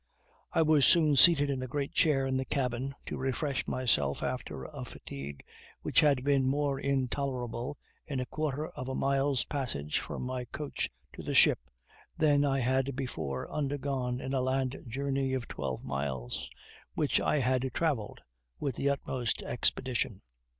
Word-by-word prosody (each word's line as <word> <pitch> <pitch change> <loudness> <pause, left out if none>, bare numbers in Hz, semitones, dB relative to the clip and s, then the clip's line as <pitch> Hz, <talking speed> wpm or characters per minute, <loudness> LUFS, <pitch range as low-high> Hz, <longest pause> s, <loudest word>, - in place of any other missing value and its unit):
I 165 - +3
was 155 -2 +4
soon 155 -4 +5
seated 145 0 +7
in 130 -2 -2
a 130 - -3
great 140 +2 -3
chair 145 -5 +3
in 135 0 0
the 130 - +1
cabin, 130 0 -2
to - - -4
refresh 135 +1 -1
myself 75 - +1
after 65 - -3
a - - -7
fatigue 70 0 -8 0.4
which - - +3
had 140 -4 +4
been 140 -2 +3
more 140 -1 0
intolerable, 130 -1 -2 0.3
in 140 -3 -2
a 125 - -1
quarter 155 +1 -2
of 130 - -7
a 130 - -2
mile's 135 -1 +1
passage 75 - -2
from - - -5
my 125 0 -3
coach 140 +4 -3 0.2
to - - -8
the - - -3
ship, - - +7 0.6
than 145 -2 +4
I 135 -2 +2
had 130 +2 +1
before 95 - -3
undergone 135 -3 -1
in 135 +1 -4
a 130 - +2
land 130 0 0
journey 135 +2 -1
of 130 -3 -2
twelve 65 -3 -4
miles, 65 -3 -3 0.5
which - - +2
I - - +2
had 130 0 +1
traveled 140 -8 -1 0.4
with 135 -4 -2
the 140 - +1
utmost 130 -4 -1
expedition. 120 -4 0
135 Hz, 160 wpm, -31 LUFS, 125-140 Hz, 0.6 s, seated